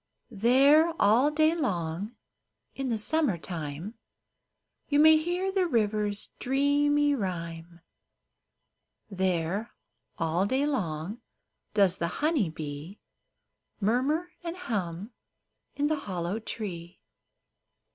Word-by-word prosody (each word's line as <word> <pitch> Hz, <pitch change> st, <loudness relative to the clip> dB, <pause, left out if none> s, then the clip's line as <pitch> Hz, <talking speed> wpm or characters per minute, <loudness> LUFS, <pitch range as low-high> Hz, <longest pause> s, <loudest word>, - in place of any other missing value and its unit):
There 275 Hz, +10 st, +5 dB
all 240 Hz, +8 st, +5 dB
day 310 Hz, +1 st, +3 dB
long, 195 Hz, -, -2 dB, 0.6 s
in 270 Hz, -1 st, -3 dB
the 230 Hz, -, 0 dB
summer 275 Hz, -, +2 dB
time, 165 Hz, +5 st, -6 dB, 0.9 s
You 285 Hz, -, +2 dB
may 315 Hz, +1 st, +7 dB
hear 350 Hz, +4 st, -1 dB
the 380 Hz, -2 st, +1 dB
river's 210 Hz, -5 st, 0 dB
dreamy 290 Hz, +2 st, +2 dB
rhyme; 170 Hz, -6 st, -5 dB, 1.3 s
There 190 Hz, +2 st, -1 dB, 0.4 s
all 165 Hz, +4 st, 0 dB
day 265 Hz, +5 st, +1 dB
long 200 Hz, -, -3 dB, 0.5 s
does 195 Hz, -4 st, +4 dB
the 170 Hz, -, -1 dB, 0.2 s
honey 300 Hz, -, +2 dB
bee 155 Hz, +4 st, -7 dB, 0.8 s
Murmur 270 Hz, -, 0 dB
and 340 Hz, +1 st, -5 dB
hum 205 Hz, -, -4 dB, 0.6 s
in 285 Hz, -, 0 dB
the 310 Hz, +1 st, +1 dB
hollow 185 Hz, -4 st, -3 dB
tree. 180 Hz, -6 st, -7 dB
215 Hz, 100 wpm, -28 LUFS, 175-290 Hz, 1.3 s, may